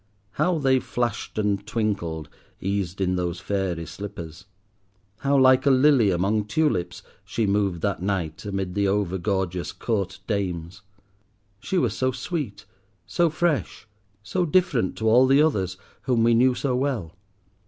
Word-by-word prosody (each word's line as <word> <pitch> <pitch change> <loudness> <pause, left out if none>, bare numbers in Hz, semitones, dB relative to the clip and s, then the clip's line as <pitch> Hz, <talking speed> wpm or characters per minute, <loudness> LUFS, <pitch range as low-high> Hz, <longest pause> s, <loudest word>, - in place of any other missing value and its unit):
How 180 +7 +1
they 135 -3 +3
flashed 120 -4 -3
and 105 -2 0
twinkled, 100 -8 -2 0.3
eased 95 -1 -2
in 90 -1 +1
those 90 0 -2
fairy 95 -4 -2
slippers. 90 -5 -8 0.7
How 140 +2 +1
like 130 +1 +5
a - - +7
lily 130 -4 +5
among 100 +4 +1
tulips 105 - 0 0.2
she 105 +3 -1
moved 100 -4 0
that 100 -3 -1
night 95 -5 -2
amid 95 -3 -3
the 100 0 +1
over 95 -2 0
gorgeous 90 -2 -2
Court 100 -5 -2
dames. 95 -3 -3 0.8
She 185 - -2
was - - +1
so 130 0 +1
sweet, 125 - -4 0.4
so 170 -1 +2
fresh, 155 -6 -1 0.4
so 180 - -1
different 165 - +1
to 110 - -2
all 125 +4 +6
the 135 +3 +5
others 95 - 0 0.2
whom 120 -4 +1
we 115 0 +4
knew 125 +2 +4
so 130 0 -1
well. 125 - -2
105 Hz, 145 wpm, -24 LUFS, 95-130 Hz, 0.8 s, a